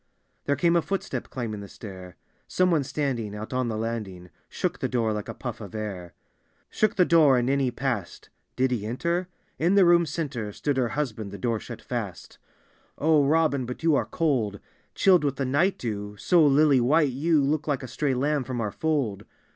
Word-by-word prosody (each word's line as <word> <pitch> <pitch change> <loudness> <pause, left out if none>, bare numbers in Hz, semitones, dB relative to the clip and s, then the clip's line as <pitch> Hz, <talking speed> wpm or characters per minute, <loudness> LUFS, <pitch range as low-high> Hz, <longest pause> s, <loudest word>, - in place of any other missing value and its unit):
There 140 - +1
came 170 +4 +2
a 170 - +4
footstep 165 -9 -4
climbing 115 -5 -4
the 100 - -8
stair, 95 -4 -10 0.3
Some 185 0 +2
one 155 -4 +2
standing 125 -7 -2
out 110 +4 -7
on 130 -1 0
the 110 -2 -2
landing 105 -6 -5 0.2
Shook - - -2
the - - -1
door 115 -3 0
like 105 -1 -4
a - - -4
puff - - -6
of - - -9
air. 95 -5 -6 0.3
— - - -41
Shook 215 +1 +1
the 180 - +4
door 155 -7 +5
and 120 0 +1
in 140 +1 +2
he 135 -2 +1
passed. 120 -6 -4 0.2
Did 130 0 +1
he 115 -5 -1
enter? 170 +11 -1 0.3
In 175 +5 +3
the 195 -2 +6
room 170 -1 +5
center 140 -9 -3
Stood 145 +4 -1
her 125 -3 +1
husband; 110 -8 -2
the 100 - -8
door 115 +2 -1
shut - - -9
fast. - - -6 0.6
"O 155 -1 +4
Robin, 140 -3 +2
but 125 +5 -7
you 165 -1 +4
are - - +1
cold 120 -11 0 0.2
— - - -40
Chilled 185 -4 +4
with 140 -2 0
the 135 0 -2
night 150 +9 +2
dew; 105 -3 -5
so 175 - +4
lily 145 -2 +5
white 145 +3 +3
you 155 +4 +2
Look 150 +2 0
like 145 -4 -1
a - - -5
stray 140 0 -1
lamb 145 +2 0
from 125 0 -4
our 105 -3 -2
fold. 140 -11 -1
130 Hz, 210 wpm, -26 LUFS, 110-155 Hz, 0.6 s, the